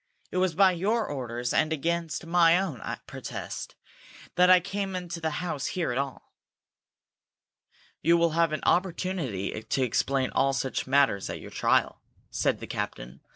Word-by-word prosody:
"It - - -3
was 185 -3 +1
by 190 +1 +6
your 210 +6 0
orders, 120 -3 -3
and 155 - +2
against 165 +1 -2
my 170 0 +5
own 165 - -3 0.2
protest, - - -7 0.6
that 180 0 +5
I 185 0 +8
came 195 +1 -3
into 175 -2 -5
the 160 - 0 0.2
house 150 -5 -2
here 175 -8 -1
at 125 - -1
all." 140 -2 -5 1.7
"You 170 +1 +4
will 170 -1 +3
have 165 0 +2
an 155 - -3
opportunity 170 - -1
to 115 +4 -1
explain 130 +2 0
all 135 0 +2
such 135 -1 -2
matters 135 -8 +2
at - - -5
your - - -10
trial," - - +1 0.3
said - - +1
the - - -5
captain. 60 +3 -5
165 Hz, 155 wpm, -27 LUFS, 135-180 Hz, 1.7 s, I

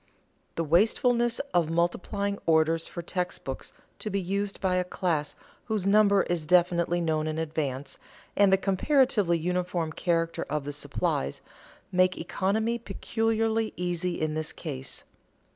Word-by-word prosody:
The 165 - 0
wastefulness 235 - +3 0.2
of 170 -3 +2
multiplying 195 +4 -1
orders 160 0 +3
for 170 - -7
text 180 +1 -3
books 135 - -6 0.3
to 215 - -3
be 200 0 0
used 200 +2 -2
by 185 -1 +1
a 180 - +2
class 165 -5 -1 0.3
whose 215 -4 -1
number 200 -1 +5
is 165 -3 -2
definitely 175 0 +3
known 155 -2 0
in 155 0 -2
advance, 145 -4 -3 0.4
and 200 -1 +5
the 190 - +6
comparatively 195 - +2
uniform 175 -1 -1
character 165 -1 0
of 150 -1 -2
the 145 - -4
supplies, 70 - -2 0.5
make 185 0 +3
economy 220 +7 0
peculiarly 225 +1 -1
easy 175 0 -2
in 155 -1 -1
this 155 0 -2
case. 135 -5 -6
180 Hz, 140 wpm, -28 LUFS, 160-200 Hz, 0.5 s, the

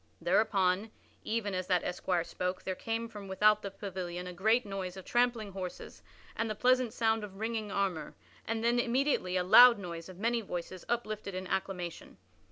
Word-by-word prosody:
Thereupon, 195 +1 +2 0.3
even 215 -3 -2
as 185 0 -2
that 180 -2 +2
esquire 180 -1 -1
spoke, 180 +2 -3
there 190 - -2
came 225 +4 -3
from 205 -3 -9
without 210 +2 +4
the 200 - -4
pavilion 185 -3 -5
a 180 - -6
great 220 +7 +2
noise 195 -2 -5
of 190 - -9
trampling 240 -4 +1
horses 185 -2 -7 0.3
and 225 0 -1
the 215 - -2
pleasant 250 +1 +3
sound 225 -1 +1
of 195 -2 -8
ringing 220 -2 -2
armor, 190 -6 -2 0.3
and 225 0 -2
then 240 +1 +3
immediately 240 -7 +1
a 180 - +1
loud 240 +6 +9
noise 170 -3 -7
of 185 - -11
many 230 +3 0
voices 180 -2 -6
uplifted 215 -4 -2
in 185 0 -4
acclamation. 180 -2 -4
200 Hz, 175 wpm, -31 LUFS, 185-225 Hz, 0.3 s, loud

